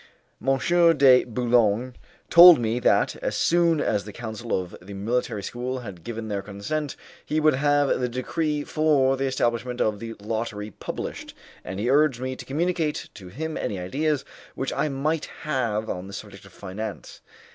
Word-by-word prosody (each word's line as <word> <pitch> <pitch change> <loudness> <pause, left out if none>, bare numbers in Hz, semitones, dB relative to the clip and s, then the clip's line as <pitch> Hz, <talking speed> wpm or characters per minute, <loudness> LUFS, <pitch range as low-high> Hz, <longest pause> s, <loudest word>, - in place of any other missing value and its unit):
M. 135 +1 +2 0.4
de 130 -2 +7
Boulogne 120 0 +1 0.4
told 175 -1 +10
me 115 0 -1
that, 125 - +2
as - - -3
soon 170 -2 +3
as 105 -8 0
the 105 - -9
council 115 0 -3
of 90 -1 -7
the 100 +2 -10
military 105 0 -2
school 125 +4 -4
had 95 -7 -9
given 115 -1 -5
their 100 -2 -2
consent, 105 +10 -4 0.3
he 155 - -1
would 155 0 +4
have 145 0 +2
the 125 -1 -1
decree 150 +4 -2
for 145 -4 +2
the 135 +1 -2
establishment 125 -1 -1
of 105 -1 0
the 115 0 -7
lottery 110 0 -4
published, - - -6 0.3
and 95 +2 -6
he 110 - -1
urged 140 -1 +3
me 130 0 -3
to - - -10
communicate 160 +1 -1
to 95 -3 -11
him 155 - -5
any 100 - -3
ideas 140 +11 -1 0.3
which 135 - -3
I 150 - 0
might 150 +3 -1 0.2
have 115 -8 -1
on 90 -2 -4
the 100 - -10
subject 100 -1 -9
of 95 - -15
finance. 105 +4 -7
125 Hz, 170 wpm, -25 LUFS, 105-145 Hz, 0.4 s, told